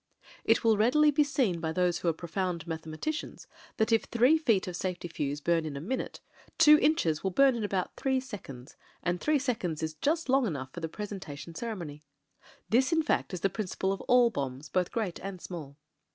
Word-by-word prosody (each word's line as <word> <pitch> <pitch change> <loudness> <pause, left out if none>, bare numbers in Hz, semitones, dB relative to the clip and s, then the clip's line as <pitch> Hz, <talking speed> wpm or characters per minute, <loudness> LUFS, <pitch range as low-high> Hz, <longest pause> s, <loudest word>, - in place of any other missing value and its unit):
It - - +3
will 225 -2 +4
readily 295 +8 +4
be 295 +1 +4
seen 250 -11 0
by 160 -1 -2
those 180 0 +1
who - - -3
are - - +5
profound 170 +1 -3
mathematicians, 160 - -5 0.3
that 220 0 +1
if 225 - +3
three 245 +6 +4
feet 225 -12 +2
of 180 - -4
safety 180 -1 -3
fuze 145 -3 -3
bum 170 +1 +2
in 150 -3 -5
a - - -4
minute, 235 - -4 0.4
two 300 -2 +8
inches 165 - +2
will 190 - +1
bum 270 +7 +5
in 230 -2 -3
about 195 -3 -2
three 265 -1 +1
seconds 150 - -9
— - - -32
and 175 0 -1
three 305 0 +3
seconds 220 - -2
is 155 0 -2
just 310 - 0
long 265 -2 +3
enough 135 -7 -4
for - - -6
the 165 -1 -4
presentation 170 -6 -7
ceremony. 170 -8 -5 0.7
This 260 +7 +3
in 320 -1 +3
fact - - 0
is 180 -3 -5
the 195 - +2
principal 190 -1 -2
of 195 - -6
all 245 -1 +5
bombs 140 - -4
both 180 -1 0
great 215 -7 -2
and 195 -1 -6
small. 155 -6 -8
185 Hz, 205 wpm, -29 LUFS, 160-245 Hz, 0.7 s, two